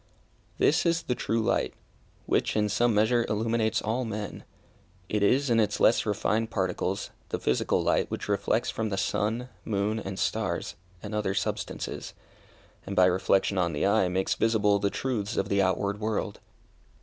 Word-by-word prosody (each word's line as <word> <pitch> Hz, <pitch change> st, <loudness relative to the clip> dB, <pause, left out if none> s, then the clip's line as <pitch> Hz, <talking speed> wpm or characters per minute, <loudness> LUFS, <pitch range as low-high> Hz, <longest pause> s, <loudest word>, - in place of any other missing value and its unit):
This 160 Hz, -, +3 dB
is 170 Hz, 0 st, +1 dB
the 130 Hz, -, -1 dB
true 115 Hz, -2 st, -1 dB
light, 120 Hz, -, 0 dB, 0.5 s
which -, -, +1 dB
in 105 Hz, -1 st, +2 dB
some 115 Hz, +2 st, +2 dB
measure 115 Hz, +3 st, +3 dB
illuminates 110 Hz, +1 st, 0 dB
all 115 Hz, +4 st, -1 dB
men. 110 Hz, -2 st, -5 dB, 0.7 s
It 105 Hz, -, 0 dB
is, 130 Hz, +6 st, +3 dB
in 115 Hz, -, +4 dB
its 110 Hz, -, +1 dB
less 110 Hz, -, +4 dB
refined 105 Hz, +2 st, 0 dB
particles, 95 Hz, 0 st, -2 dB, 0.2 s
the -, -, -1 dB
physical 65 Hz, -, +1 dB
light -, -, +1 dB
which -, -, -4 dB
reflects 105 Hz, +4 st, 0 dB
from 110 Hz, -1 st, -2 dB
the 95 Hz, -, -2 dB
sun, 110 Hz, +5 st, -1 dB
moon, 105 Hz, +1 st, -1 dB
and 95 Hz, -2 st, -6 dB
stars, 95 Hz, -1 st, -1 dB, 0.3 s
and 105 Hz, 0 st, -6 dB
other 105 Hz, -2 st, -1 dB
substances; 100 Hz, -, -3 dB, 0.7 s
and 100 Hz, -, -5 dB
by 90 Hz, -, +6 dB
reflection 95 Hz, +1 st, +2 dB
on 85 Hz, -2 st, +1 dB
the 75 Hz, -, 0 dB
eye, 100 Hz, -1 st, +3 dB
makes 95 Hz, +1 st, 0 dB
visible 105 Hz, -3 st, +2 dB
the 100 Hz, 0 st, +1 dB
truths 105 Hz, -1 st, -2 dB
of -, -, 0 dB
the 100 Hz, 0 st, +3 dB
outward 100 Hz, +2 st, 0 dB
world. 110 Hz, -1 st, -2 dB
105 Hz, 165 wpm, -28 LUFS, 100-115 Hz, 0.7 s, by